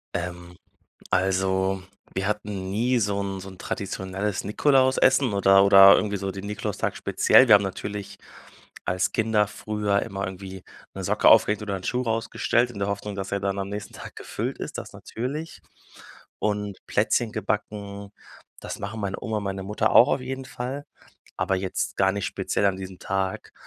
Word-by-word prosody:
Ähm, 90 0 -5 0.5
also 95 0 +1 0.3
wir 95 +1 -1
hatten 105 -2 -3
nie 120 +5 +1
so 100 -1 0
'n 100 -1 -4
so 95 +1 -8
'n 95 - -13
traditionelles 95 -1 -3
Nikolausessen 130 +1 +3
oder 95 0 +5
oder 100 0 +9
irgendwie 100 +1 0
so 95 0 -3
den 100 +1 -7
Nikolaustag 105 0 -3
speziell. - - +4
Wir - - +9
haben 100 - +3
natürlich 100 +1 -5 0.7
als 90 +2 0
Kinder 110 -2 +2
früher 105 -2 -1
immer 100 0 -4
irgendwie 95 0 -8 0.3
'ne - - -5
Socke - - +3
aufgehängt 105 +1 +5
oder 100 -2 -3
'n 95 - -9
Schuh 125 +1 0
rausgestellt 120 +1 0
in 115 - -9
der 100 0 -1
Hoffnung, 100 0 -4
dass 95 0 -5
er 100 - 0
dann 100 0 -1
am 100 0 -3
nächsten 105 0 -6
Tag - - -9
gefüllt - - -4
ist, - - -6
das - - -7
natürlich. 145 +8 -6 0.8
Und 105 -2 -2
Plätzchen 110 +2 +1
gebacken, 100 -1 -4 0.5
das - - -6
machen 105 +2 -5
meine 100 -1 -2
Oma 110 -1 -2
und 105 - -5
meine 95 0 -3
Mutter 105 +2 0
auch 125 - +8
auf 140 - +1
jeden 130 +1 -5
Fall. 130 +2 -5 0.5
Aber 95 - +1
jetzt 95 0 -3
gar 95 0 +3
nicht 100 -2 -2
speziell 100 - -1
an 100 -1 +1
diesem 95 -1 -8
Tag. 95 -1 -3
100 Hz, 170 wpm, -25 LUFS, 95-105 Hz, 0.8 s, oder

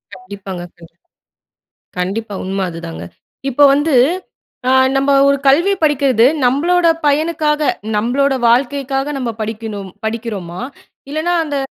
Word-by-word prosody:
கண்டிப்பாங்க 185 -1 -8
கண்டிப் 170 0 -17 1.0
கண்டிப்பா. 205 +4 -3
உண்ம 195 +1 -3
அதுதாங்க. 85 - -7 0.5
இப்ப 275 +3 +3
வந்து, 295 +2 +1 0.7
அ, - - +4 0.3
நம்ம 275 +1 +2 0.2
ஒரு 280 - +3
கல்வி 335 +9 +4
படிக்கிறது. 275 -6 +3 0.2
நம்மளோட 335 +7 +2 0.2
பயனுக்காக. 305 0 +1 0.4
நம்மளோட 265 +6 +1 0.2
வாழ்க்கைக்காக 270 +3 0
நம்ம 250 -3 -2
படிக்கணும். 215 -3 -5
படிக்கிறோமா? 215 -6 -4 0.5
இல்லன்னா, 315 +4 -1
அந்த 290 -2 -3
250 Hz, 110 wpm, -16 LUFS, 200-290 Hz, 1.0 s, அ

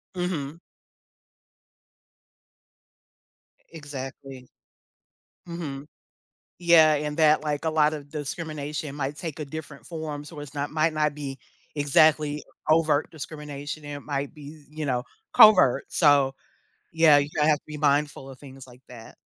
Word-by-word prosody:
Mhm. 165 -4 -3 3.0
E - - -35
exactly. 135 -4 -9 1.0
Mhm. 150 -5 -6 0.7
Yeah, 165 -3 +6
and 150 +1 -3
that, 155 -1 +4
like, 150 +1 -3
a - - +2
lot 155 -1 +2
of 145 -2 -8
discrimination 150 -1 -5
might 140 0 -3
take 165 -4 -6
a 150 - -4
different 145 -4 -9
form, 155 -3 -6
so, 150 0 -10
it's 145 -2 -9
not 145 0 -3
might 155 +1 +1
not 150 -1 0
be 140 -2 -6 0.4
exactly 150 +1 +3 0.3
overt 155 -2 +2
discrimination 150 -1 -7
and 145 0 -6
it - - -23
might 140 -1 -3
be, 150 0 -12
eh, 150 - -24
you 155 -1 -3
know, 125 -3 -1 0.3
covert, 190 - +7
so, 145 -4 +4 0.6
yeah, 160 -3 +6
you 145 - -1
have 150 0 +4
to - - -39
be 150 - -7
mindful 145 -2 0
of 130 - -12
things 135 -2 -12
like 125 -1 -17
that. 120 -2 -13
150 Hz, 140 wpm, -25 LUFS, 140-155 Hz, 3.0 s, covert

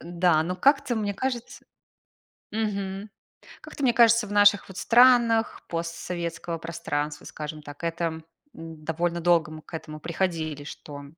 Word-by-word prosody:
Н-да, 170 -2 +2
но 180 +2 -3
как-то 275 +2 +3
мне 205 -2 -1
кажется 245 0 -4 0.9
Мгм. 200 -2 -3 0.5
Как-то 285 - -8
мне 245 -3 +4
кажется 230 -1 +5
в - - -9
наших, 205 -1 +5
вот, 190 - -10
странах 235 -2 +4
постсоветского 170 0 -4
пространства, 150 -3 -4
скажем 155 0 -7
так, 145 +2 -11
это 170 0 -1
м, 160 -1 -4 0.6
довольно 170 +2 -1
долго 170 -2 +3
мы 155 0 -9
к 160 - -20
этому 155 -1 -7
приходили, 165 -3 -2
что 145 -1 -9
175 Hz, 140 wpm, -26 LUFS, 160-210 Hz, 0.9 s, кажется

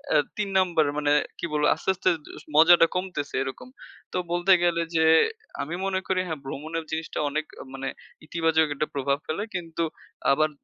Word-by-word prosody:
আ - - +7 0.2
৩ 210 -1 -1
number 170 -4 +3
মানে 145 -1 +1 0.3
কি - - -2
বলবো? 150 0 +2
আস্তে, - - -4
আস্তে 185 - +1 0.3
এস - - -12
মজাটা 165 +2 +7
কমতেছে 180 -6 -3
এরকম। 135 - -7 0.5
তো - - 0
বলতে 175 +2 +4
গেলে, 170 -1 +2
যে 160 0 +4 0.6
আমি 160 +4 -4
মনে 190 -1 0
করি 190 -1 +1
হ্যাঁ, 160 -3 -4
ভ্রমণের 155 +4 -4
জিনিসটা 160 0 -3
অনেক 155 +2 -2 0.3
মানে 135 0 -5 0.4
ইতিবাচক 160 0 +2
একটা 150 +2 -1
প্রভাব 140 0 +1
ফেলে, 160 +6 -2
কিন্তু 165 -2 -3 0.5
আবার 155 +3 +3
160 Hz, 170 wpm, -26 LUFS, 150-175 Hz, 0.6 s, আ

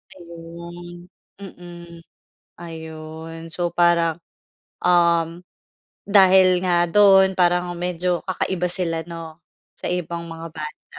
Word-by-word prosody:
Ayun. 170 0 -11 0.3
Mm. 175 -3 -12 0.6
Ayun 160 0 -9
so 175 +1 -2
parang, 170 -2 +3 0.7
um, 170 -1 +2 0.7
dahil 190 -2 +5
nga 175 -1 +2
do'n 195 0 +5
parang 180 -1 +1
medyo 180 0 -2
kakaiba 180 -1 -1
sila, 175 -3 0
'no? 165 -1 -9 0.4
Sa - - -6
ibang 170 -1 -3
mga 165 0 -8
banda. 155 -2 -8
175 Hz, 100 wpm, -22 LUFS, 165-180 Hz, 0.7 s, dahil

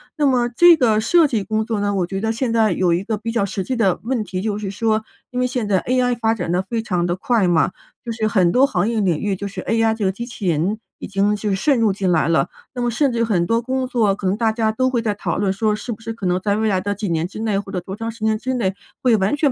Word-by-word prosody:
那 300 -2 +1
么 250 -3 +3
这 335 +7 +6
个 220 -5 +3
设 330 +7 +4
计 225 -6 -1
工 215 +2 -1
作 220 -3 -2
呢， 205 0 0
我 180 -3 0
觉 195 +1 -4
得 225 0 0
现 230 0 -1
在 220 -3 +3
有 175 -1 +2
一 180 +3 0
个 220 0 -2
比 230 +2 -5
较 200 -4 +1
实 190 -1 -4
际 260 - -2
的 195 -6 +1
问 240 -2 -1
题。 185 -2 -4
就 210 -1 -2
是 200 -2 -4
说， 220 +1 0 0.3
因 250 0 -2
为 - - +2
现 245 -4 -2
在 190 -3 +2
ai 250 -1 +1
发 225 -1 +1
展 175 -6 -3
得 180 - +2
非 225 +4 -3
常 180 -5 -1
地 175 +1 -1
快 210 -3 +1
嘛， 170 +1 +3 0.3
就 230 - -3
是 220 -1 -1
很 185 -5 +3
多 265 +2 +5
行 185 -6 0
业 230 -2 0
领 175 -6 +1
域 200 -2 -1
就 200 - -6
是 - - -8
ai 225 0 +2
这 215 -3 -2
个 190 - +2
机 235 +4 -6
器 225 -6 -6
人 175 +7 0 0.2
已 - - -6
经 200 +1 +1
就 205 -1 -2
渗 260 +8 +2
入 215 -3 +3
进 190 -1 -1
来 165 -1 +2
了。 155 -5 +2 0.3
那 245 - -4
么 240 - +1
甚 265 +3 +1
至 230 -1 0
很 180 -6 +1
多 230 +3 +1
工 260 +1 -2
作 225 -6 +1
可 200 - -7
能 190 +3 +1
大 225 -2 +1
家 220 -1 +1
都 255 +4 +1
会 240 -3 0
在 215 -2 0
讨 205 - -3
论 200 -2 +1
说 210 +1 0
是 225 +3 -6
不 215 - -6
是 225 0 -5
可 205 -4 -7
能 180 +1 +1
在 200 +1 0
未 220 0 +1
来 190 -2 +1
的 205 +2 -2
几 205 -2 -3
年 165 +1 0
之 205 - -9
内 215 -3 0
或 200 -1 -8
者 180 - -2
多 190 +2 -8
长 225 0 -4
时 225 -1 -9
间 220 0 +2
之 260 +3 -3
内 195 -6 0 0.3
会 240 -4 +4
完 195 +8 +1
全 290 -2 +2
215 Hz, 330 characters per minute, -20 LUFS, 195-235 Hz, 0.3 s, 这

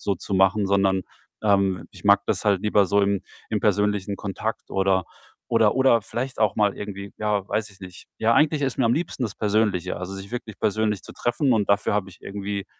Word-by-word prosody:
So 100 - 0
zu 100 - -5
machen, 95 +2 +3
sondern, 95 -1 +2 0.4
ähm, 100 -3 +2
ich - - -15
mag 100 0 +5
das - - -1
halt 100 -3 +2
lieber 105 -1 +3
so 100 +2 +3
im 100 -1 +1 0.3
im 105 - 0
persönlichen 105 -1 +1
Kontakt 100 -2 -4
oder 95 -1 +1 0.4
oder 115 -2 +3
oder 130 -4 +4
vielleicht 125 +6 -5
auch 110 -3 +2
mal 105 -2 +2
irgendwie 100 -1 -7
ja, 105 -2 0
weiß 110 -1 -2
ich 100 - -20
nicht. 90 -1 -11
Ja, 115 +1 +3
eigentlich 150 +1 +3
ist 135 -3 -1
mir 130 - +3
am 115 +1 +3
liebsten 160 -5 -3
das 110 -4 -2
Persönliche, 105 -4 0
also, 90 +2 -6
sich 95 +1 -9
wirklich 115 -3 -6
persönlich 105 -1 0
zu - - -11
treffen 125 +3 0
und 105 -3 +1
dafür 100 0 +2
habe 100 -2 -1
ich 90 - -18
irgendwie 100 0 -4
100 Hz, 210 wpm, -24 LUFS, 95-110 Hz, 0.4 s, mag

